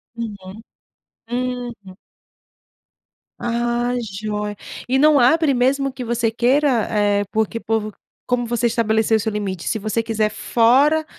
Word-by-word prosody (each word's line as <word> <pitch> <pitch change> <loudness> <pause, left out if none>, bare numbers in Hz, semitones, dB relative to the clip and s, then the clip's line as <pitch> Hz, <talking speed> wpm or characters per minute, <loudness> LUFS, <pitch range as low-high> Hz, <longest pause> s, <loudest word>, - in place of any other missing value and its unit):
Uhum, 205 -2 -7 0.7
uhum. 245 -6 -4 1.4
Ah, 240 +1 -1
joia 210 0 -4 0.3
e 265 - +3
não 300 0 +5
abre 285 +3 +4
mesmo 270 +2 +1
que 255 -2 -6
você 235 -1 0
queira, 250 +1 +2
eh, 205 -1 +1
porque 220 +1 -1
o - - -18
povo 215 -1 -1 0.3
como 245 -1 0
você 240 0 -1
estabeleceu 220 -1 +1
o - - -2
seu 220 - -2
limite, 195 -4 -4
se 225 - 0
você 215 +2 -1
quiser 220 -1 0
fora 275 +9 +3
230 Hz, 135 wpm, -20 LUFS, 215-250 Hz, 1.4 s, não